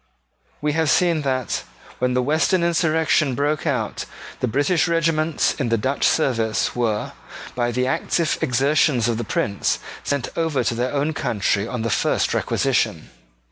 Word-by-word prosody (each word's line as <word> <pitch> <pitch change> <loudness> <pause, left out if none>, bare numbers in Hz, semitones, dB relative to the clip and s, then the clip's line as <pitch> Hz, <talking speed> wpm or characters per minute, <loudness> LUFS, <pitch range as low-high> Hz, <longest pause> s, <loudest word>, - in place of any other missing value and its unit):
We 150 0 +1
have 160 -1 +1
seen 170 -2 +3
that, 130 -4 -1 0.4
when 125 0 +1
the 125 - +2
Western 160 +6 +2
insurrection 160 -4 +2
broke 145 +2 -1
out, - - -2 0.3
the 125 - 0
British 145 +9 +1
regiments 165 -2 +1
in 130 -4 0
the 115 - +2
Dutch 130 +6 0
service 115 -8 +1
were, 115 -4 -1 0.4
by 120 -1 0
the 125 +2 0
active 155 +4 0
exertions 135 -1 +2
of 115 -1 -1
the - - -2
Prince, 100 -1 -1 0.3
sent 140 -3 -2
over 160 -6 0
to 120 - 0
their 125 +2 -1
own 145 +2 0
country 110 -6 0
on 120 -1 -4
the 115 - -1
first 105 - +1
requisition. - - 0
135 Hz, 155 wpm, -22 LUFS, 120-155 Hz, 0.4 s, seen